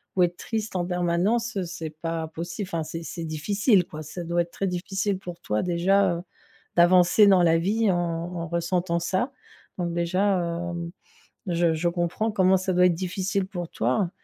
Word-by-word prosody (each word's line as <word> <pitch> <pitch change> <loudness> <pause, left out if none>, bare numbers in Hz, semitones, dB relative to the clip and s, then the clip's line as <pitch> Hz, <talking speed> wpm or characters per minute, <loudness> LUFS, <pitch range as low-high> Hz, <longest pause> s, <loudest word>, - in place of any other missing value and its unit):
ou 180 - +4
être 175 0 0
triste 220 -3 -4
en 175 -1 0
permanence, 180 +6 0
c'est 165 -2 -5
pas 165 0 -4
possi 170 +5 -5
enfin, 170 -4 -3
c'est 165 +2 -6
c'est 170 +2 -6
difficile 185 - +2
quoi, 155 0 -8
ça 155 +3 -7
doit 170 +1 +1
être 170 - -4
très 195 - -3
difficile 190 +2 -1
pour 175 -2 -8
toi 105 0 -1
déjà, 180 +1 +2
heu, - - -6 0.6
d'avancer 180 +4 +6
dans 190 -3 +6
la 165 -1 +4
vie 210 +4 +1
en 175 - +2
en 170 0 -3
ressentant 170 +1 0
ça. 190 +10 -1 0.5
Donc 170 -1 -1
déjà, 185 +4 +1
hem, 170 0 -3 0.6
je 170 -1 +2
je 170 +2 0
comprends 175 +6 -1
comment 190 -1 +4
ça 185 0 -1
doit 180 0 +5
être 175 - +2
difficile 190 +2 -2
pour 175 -4 -5
toi, 130 - 0
175 Hz, 180 wpm, -25 LUFS, 170-190 Hz, 0.6 s, d'avancer